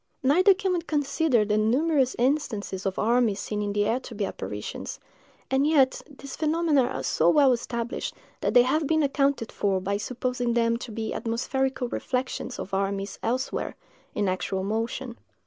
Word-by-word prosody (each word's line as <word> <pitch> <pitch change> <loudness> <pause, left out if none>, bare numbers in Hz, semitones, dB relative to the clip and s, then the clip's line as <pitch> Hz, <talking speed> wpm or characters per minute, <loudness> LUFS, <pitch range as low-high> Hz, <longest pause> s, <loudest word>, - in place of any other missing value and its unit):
Neither 365 +9 +5
can 380 -1 -1
we 350 - 0
consider 290 -6 +1
the 210 0 +1
numerous 265 +4 +2
instances 230 -8 -1
of 190 - -3
armies 230 -2 +2
seen 210 -1 -3
in 205 0 -1
the 205 0 +1
air 230 +4 +1
to 245 -3 -10
be 205 -1 -1
apparitions; 105 - -6 0.5
and 270 +2 +3
yet 275 -4 +3
these 275 -1 -9
phenomena 310 -3 +2
are - - -4
so - - +2
well 285 -4 +5
established 235 0 -3 0.2
that - - -1
they 245 - +8
have 295 +4 +1
been 315 0 +2
accounted 275 -4 +1
for 195 -2 0
by 200 +2 -1
supposing 245 +1 -2
them 230 -1 +2
to 235 0 -8
be 220 0 -3
atmospherical 260 +3 -1
reflections 255 0 -3
of 195 - -7
armies 195 +1 -2
elsewhere, 255 +4 -2 0.4
in 205 -1 +1
actual 190 +1 -1
motion. 230 +4 -3
245 Hz, 165 wpm, -26 LUFS, 210-275 Hz, 0.5 s, they